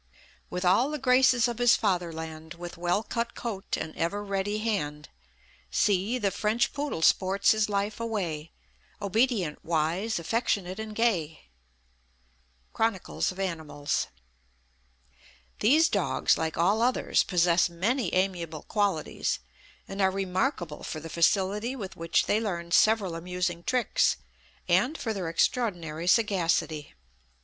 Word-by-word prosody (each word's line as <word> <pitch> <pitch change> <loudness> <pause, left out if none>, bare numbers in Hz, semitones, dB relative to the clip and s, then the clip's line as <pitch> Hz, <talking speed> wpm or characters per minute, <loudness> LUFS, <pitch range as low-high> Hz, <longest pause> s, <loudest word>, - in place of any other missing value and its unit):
"With 180 +1 -3
all 200 +10 +4
the 300 - -3
graces 255 -2 +4
of 240 -1 -4
his 245 -1 +6
fatherland; 160 -5 -3
With 175 0 -8
well 175 +4 0
cut 235 +1 -3
coat, 210 -5 -4
and 160 0 -5
ever 200 +5 -1
ready 200 +1 -1
hand 150 -10 -2 0.6
See 205 +4 +1
the 200 -5 0
French 215 +4 0
poodle 285 - -3
sports 195 +3 +4
his 215 -1 +1
life 205 +2 -1
away; 175 -9 -3 0.5
Obedient, 205 - 0
wise, 170 +7 0
affectionate, 190 0 -1
and 220 -1 -6
gay." 175 -10 0 1.3
Chronicles 225 -5 0
of 185 - -11
Animals. 160 -6 -2 1.5
These 305 +9 +5
dogs, - - +1
like 160 -1 -3
all 195 +7 +3
others, 250 +2 +2
possess 175 -1 +3
many 200 +6 -1
amiable 175 -5 -1
qualities, 200 -7 -1 0.5
and 195 +1 -4
are 190 - +4
remarkable 190 - -2
for 155 - -5
the 165 +1 -8
facility 195 +8 +1
with 200 -7 -7
which 165 0 +1
they 215 - +1
learn 170 -5 -3
several 210 -3 +4
amusing 175 0 -3
tricks, 245 - +1 0.5
and 240 - +2
for 225 -4 -2
their 185 -5 -3
extraordinary 170 -4 -1
sagacity. 175 -7 +1
190 Hz, 125 wpm, -28 LUFS, 170-220 Hz, 1.5 s, his